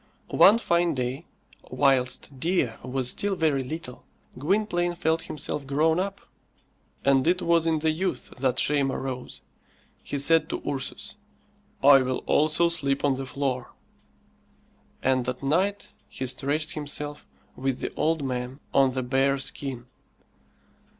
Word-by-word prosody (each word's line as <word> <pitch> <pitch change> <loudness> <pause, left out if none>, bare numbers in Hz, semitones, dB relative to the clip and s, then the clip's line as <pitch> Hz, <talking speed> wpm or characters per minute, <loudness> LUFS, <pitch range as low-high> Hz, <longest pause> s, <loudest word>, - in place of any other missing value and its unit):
One 210 +4 +7
fine 170 -7 +1
day, 130 +5 -3 0.4
whilst 130 0 +1
Dea 165 -6 +1
was 130 0 -1
still 200 -1 -1
very 155 -6 +1
little, 130 -2 -7 0.3
Gwynplaine 175 +3 0
felt 160 -1 0
himself 145 -1 -3
grown 160 +4 +2
up, 195 +1 -3 0.8
and 135 +1 +4
it 180 +1 +3
was 170 -1 +3
in 160 -1 +2
the 160 +1 +1
youth 165 -4 -3
that 130 -1 +1
shame 140 -2 +2
arose. 125 - -5 0.6
He 145 - -4
said 160 +4 +3
to - - -4
Ursus, 140 -3 -4 0.7
"I 140 -1 +8
will 130 0 -2
also 155 +3 +3
sleep 140 -5 0
on 140 - +3
the 135 0 -5
floor." 130 -2 -3 1.3
And 130 -1 +1
at 125 +2 -5
night 185 +8 0 0.2
he 130 - -5
stretched 140 +5 -1
himself, 150 -1 -5 0.3
with 135 -1 -2
the - - -4
old 160 -2 0
man, 125 +1 -4
on 135 -1 +4
the 130 0 -2
bear 135 +2 +2
skin. 135 -2 -4
140 Hz, 135 wpm, -26 LUFS, 130-160 Hz, 1.3 s, I